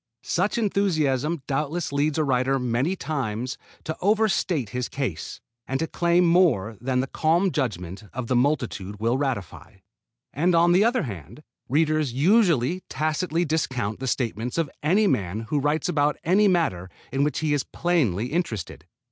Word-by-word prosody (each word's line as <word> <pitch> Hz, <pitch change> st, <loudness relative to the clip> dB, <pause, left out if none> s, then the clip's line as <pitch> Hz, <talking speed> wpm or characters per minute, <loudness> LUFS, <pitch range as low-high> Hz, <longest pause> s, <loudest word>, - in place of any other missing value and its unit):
Such 195 Hz, +7 st, 0 dB
enthusiasm 165 Hz, -, 0 dB
doubtless 150 Hz, +4 st, -2 dB
leads 145 Hz, +1 st, +1 dB
a 155 Hz, -, +2 dB
writer 135 Hz, -1 st, +1 dB
many 125 Hz, +7 st, 0 dB
times 130 Hz, -, -3 dB, 0.3 s
to 160 Hz, -, -4 dB
over 215 Hz, +3 st, +3 dB
state 170 Hz, -, -1 dB
his 125 Hz, +1 st, -3 dB
case, 130 Hz, -, -4 dB, 0.3 s
and 135 Hz, +1 st, -1 dB
to 160 Hz, -, 0 dB
claim 170 Hz, +2 st, +2 dB
more 165 Hz, -, +3 dB
than 130 Hz, 0 st, 0 dB
the -, -, -1 dB
calm 170 Hz, +7 st, +1 dB
judgment 100 Hz, -, -3 dB
of 125 Hz, 0 st, -4 dB
the 125 Hz, -, 0 dB
multitude 120 Hz, -7 st, -1 dB
will 115 Hz, +4 st, +1 dB
ratify. 130 Hz, -11 st, -4 dB, 0.6 s
And 170 Hz, +5 st, +2 dB
on 170 Hz, +1 st, +5 dB
the 185 Hz, +4 st, +5 dB
other 240 Hz, +2 st, +2 dB
hand, 100 Hz, -, -8 dB, 0.3 s
readers 155 Hz, -1 st, +1 dB
usually 170 Hz, -, +3 dB
tacitly 160 Hz, +2 st, -1 dB
discount 130 Hz, -9 st, -1 dB
the 135 Hz, -, -4 dB
statements 120 Hz, 0 st, -2 dB
of 165 Hz, -4 st, 0 dB
any 190 Hz, +9 st, +3 dB
man 105 Hz, -, 0 dB
who 150 Hz, -, +2 dB
writes 150 Hz, +3 st, 0 dB
about 145 Hz, 0 st, +1 dB
any 195 Hz, +5 st, +4 dB
matter 160 Hz, -, 0 dB, 0.2 s
in 135 Hz, +1 st, +2 dB
which 150 Hz, -2 st, 0 dB
he 155 Hz, -2 st, +1 dB
is 145 Hz, -, +1 dB
plainly 125 Hz, -, 0 dB
interested. 120 Hz, -, -3 dB
145 Hz, 160 wpm, -25 LUFS, 125-170 Hz, 0.6 s, on